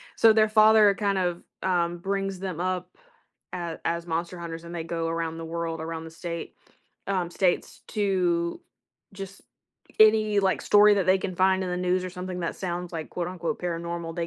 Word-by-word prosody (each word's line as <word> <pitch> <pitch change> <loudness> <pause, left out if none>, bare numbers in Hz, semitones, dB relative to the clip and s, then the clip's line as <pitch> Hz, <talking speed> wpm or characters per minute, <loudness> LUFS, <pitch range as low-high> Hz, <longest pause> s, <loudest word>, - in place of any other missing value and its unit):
So, 225 -1 +6
their 215 0 +4
father 215 -1 +6
kind 200 -1 0
of, 175 -2 -1 0.2
um, 175 -2 +1
brings 195 +1 -2
them 185 -3 -4
up 180 0 -3 0.6
a 170 -2 -4
as 170 +1 -1
monster 170 +2 -3
hunters 165 -1 -7
and 170 +1 -8
they 165 - -4
go 165 0 -2
around 165 0 -3
the 165 - -6
world, 165 0 -3
around 160 0 -5
the 160 - -9
state 170 0 -6 0.5
um, 185 -3 -1
states 180 -1 0
to 180 -4 0 0.5
just 195 0 -9 0.6
any, 215 -1 +5
like, 190 -1 +1
story 210 0 +6
that 195 -2 +1
they 190 +1 +5
can 185 -1 -4
find 190 +1 +3
in 185 - -3
the 180 - -1
news 180 0 0
or 185 - -4
something 180 0 -5
that 170 - -2
sounds 180 -1 -4
like 160 -2 -5
quote, 175 -1 -3
unquote 180 -2 -4
"paranormal," 170 -1 -4
they 170 -1 -2
180 Hz, 190 wpm, -26 LUFS, 170-195 Hz, 0.6 s, So